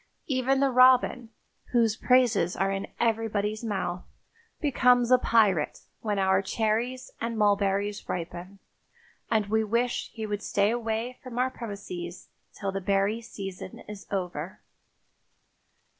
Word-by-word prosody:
Even 265 0 +1
the 275 -1 +3
robin, 255 -1 +5 0.4
whose 230 -3 +3
praises 240 -9 +3
are 195 0 0
in 195 0 -3
everybody's 215 -2 0
mouth, 190 -5 -2 0.6
becomes 250 -4 +3
a 255 - +7
pirate 205 -11 +2 0.2
when 210 -2 -2
our 190 0 +3
cherries 225 +5 -1
and 230 0 -2
mulberries 200 -1 +1
ripen, 180 +2 -5 0.7
and 215 -2 +2
we 220 +2 +1
wish 235 +3 -1
he 220 -2 -5
would 205 -1 -3
stay 205 +1 +1
away 235 +1 -2
from 250 -2 -8
our 255 +1 +1
premises 195 -7 -7 0.2
till 195 -1 -4
the 195 0 -3
berry 200 +4 +1
season 195 -5 -8
is 210 -1 -9
over. 180 -2 -4
215 Hz, 130 wpm, -27 LUFS, 195-240 Hz, 0.7 s, a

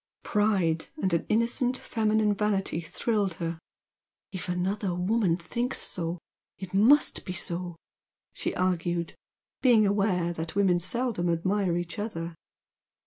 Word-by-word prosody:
Pride, 195 -7 +1
and 190 - 0
an 170 - 0
innocent 240 +3 +2
feminine 215 -3 +1
vanity 195 -5 0
thrilled 200 +2 -1
her; 165 0 -4 0.7
"if 185 -1 -5
another 185 +1 -1
woman 185 -1 +1
thinks 240 +9 -2
so, 170 -1 -3 0.4
it 190 -1 -8
must 240 +10 +4
be 180 - -5
so," 175 0 -4 0.6
she - - -3
argued, 175 -2 0 0.5
being 235 -5 +5
aware 195 -4 +1
that 165 0 -5
women 190 -3 +3
seldom 210 -2 -1
admire 180 +1 +1
each 175 +4 -4
other. 170 -6 -4
190 Hz, 125 wpm, -28 LUFS, 175-215 Hz, 0.7 s, being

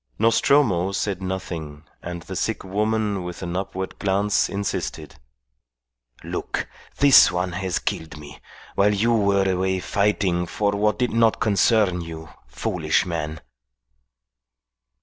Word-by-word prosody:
Nostromo 110 -4 +3
said 100 -1 -2
nothing, 85 -6 -5 0.2
and 85 -1 -6
the 95 - -7
sick 110 +5 -2
woman 105 +1 -1
with 90 +1 -7
an 85 0 -4
upward 95 0 -4
glance 100 +1 +1
insisted. 100 0 -4 1.1
"Look, - - -4 0.3
this 140 -1 +7
one 90 +1 -1
has 95 0 -2
killed 80 -1 -4
me, 75 -2 -11 0.3
while 105 +1 +3
you 115 +4 +2
were 100 -3 +2
away 95 0 0
fighting 95 -3 0
for 100 +4 0
what 105 +1 +1
did 125 -2 0
not 115 -1 +3
concern 100 -3 +2
you, 80 -1 -8 0.2
foolish - - 0
man." 80 -2 -4
95 Hz, 125 wpm, -23 LUFS, 90-105 Hz, 1.1 s, this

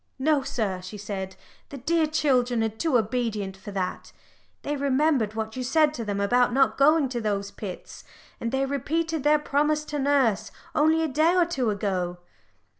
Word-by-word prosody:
"No, 290 +1 +2
sir," 220 -9 -2
she 185 +3 -8
said, 195 -2 -5 0.3
"the 280 - -8
dear 315 +4 +1
children 250 -6 +1
are 225 - +1
too 250 +5 +1
obedient 215 -4 -2
for 195 +2 -11
that. 190 -2 -4 0.5
They 295 - -2
remembered 275 -5 +1
what 220 0 -4
you 255 - -3
said 300 +4 +3
to 235 - -4
them 205 -2 -3
about 245 +5 +3
not 270 +1 +3
going 295 +1 +4
to 240 -2 -3
those 200 -2 -2
pits, 190 -4 -8 0.4
and 230 - -3
they 265 0 +1
repeated 315 +3 -2
their 300 +1 +5
promise 300 +1 0
to 295 -1 -4
nurse 270 -7 +2 0.2
only 315 +2 +3
a - - +1
day 310 +5 +2
or 355 -2 +4
two 270 -9 -1
ago." 185 -4 -2
255 Hz, 180 wpm, -26 LUFS, 210-300 Hz, 0.5 s, their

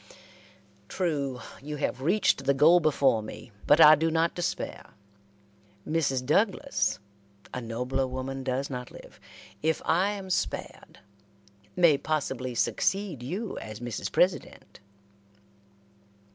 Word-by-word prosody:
"True, 140 -8 -2 0.2
you 150 +2 -6
have 135 -3 -3
reached 165 -3 +2
the 140 - +3
goal 160 +6 +6
before 140 -7 +2
me, 110 +2 -10 0.2
but 145 - +5
I 155 -1 +10
do 160 +2 +2
not 165 +1 +1
despair. 175 - -4 0.9
Mrs. 140 -5 0
Douglas 205 - +1 0.6
a 125 - -4
nobler 125 +3 -2
woman 130 +1 -5
does 130 +1 -2
not 125 -2 -6
live - - -14 0.4
if 160 +1 +1
I 185 +4 +2
am 195 -2 -7
spared, - - -4 0.7
may 170 -6 +4
possibly 135 -5 -2
succeed 190 - 0
you 190 - -4
as 110 -1 -8
Mrs. 120 -3 -5
President." 180 0 -1
145 Hz, 115 wpm, -27 LUFS, 130-170 Hz, 0.9 s, I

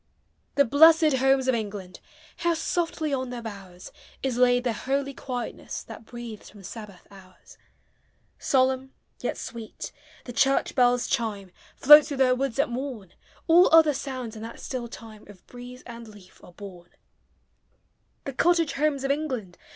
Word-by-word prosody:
The 280 - +4
blessed 310 +2 +6
Homes 265 0 +2
of 260 - +3
England! 205 -5 -5 0.4
How 340 -1 +1
softly 325 -2 -2
on 260 -1 -2
their 245 -1 -6
bowers 195 -5 -10 0.3
Is 265 -3 -1
laid 245 0 +3
the 240 -2 0
holy 275 +4 -2
quietness 250 -2 -6
That - - -11
breathes 235 -3 -9
from 205 -2 -15
Sabbath 205 -2 -10
hours! 185 -2 -17 0.8
Solemn, 265 -1 +1 0.3
yet - - -3
sweet, 230 -2 -8 0.3
the 245 - -7
church 270 +3 +2
bell's 245 -1 +3
chime 210 -7 -2 0.2
Floats 295 +2 +8
through 285 -3 -5
their 260 -1 +4
woods 265 -1 -2
at 280 - +2
morn; 240 -7 -6 0.3
All 345 +2 +6
other 320 -2 +6
sounds, 260 -4 -6
in 215 - -9
that 230 +1 -8
still 250 -3 -5
time, 220 -2 -12
Of 200 -3 -16
breeze 250 +1 -11
and 235 -1 -10
leaf 205 -4 -17
are 175 - -15
born. 180 -3 -11 1.3
The 275 - -6
cottage 335 +3 +2
Homes 285 -1 0
of 275 - +1
England! 260 - -3
250 Hz, 155 wpm, -26 LUFS, 220-275 Hz, 1.3 s, Floats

